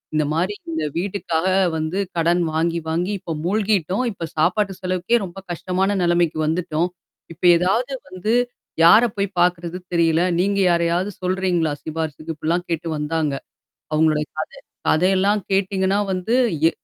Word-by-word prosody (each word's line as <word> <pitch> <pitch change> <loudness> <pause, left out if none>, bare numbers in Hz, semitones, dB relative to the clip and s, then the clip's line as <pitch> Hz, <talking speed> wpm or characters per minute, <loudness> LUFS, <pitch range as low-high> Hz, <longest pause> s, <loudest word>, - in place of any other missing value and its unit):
இந்தமாரி 160 +6 0 0.2
இந்த 160 -1 -2
வீட்டுக்காக 180 -2 -1 0.3
வந்து 160 +5 -2 0.2
கடன் 170 +2 +2
வாங்கி, 170 +1 0
வாங்கி 175 +5 -1
இப்ப 165 - -5
மூழ்கிட்டோம். 200 +2 +1
இப்ப 170 -4 -5
சாப்பாட்டு 190 +5 +2
செலவுக்கே 185 +5 +1
ரொம்ப 175 +1 -11
கஷ்டமான 185 +3 -1
நிலைமைக்கு 170 -2 +2
வந்துட்டோம். 170 +1 0 0.4
இப்ப 170 - -24
ஏதாவது 225 +10 0 0.2
வந்து 185 +4 -3 0.5
யார 215 +8 +8
போய் 200 0 0
பார்க்கறது? 175 0 +1 0.2
தெரியல. 165 -1 +3 0.2
நீங்க 200 +2 +1
யாரையாவது 170 +3 +1
சொல்றீங்களா, 180 -4 0
சிபாரிசுக்கு? 160 0 -4
இப்பிடிலாம் 170 +3 -1
கேட்டு 165 0 -2
வந்தாங்க. 150 -1 -1 0.6
அவுங்களுடைய 155 -1 +2
கத 485 - -3 0.4
கதையெல்லாம் 195 +4 +3
கேட்டீங்கன்னா 195 0 +1
வந்து, 185 +6 -1 0.3
எ - - 0
175 Hz, 130 wpm, -21 LUFS, 165-190 Hz, 0.6 s, யார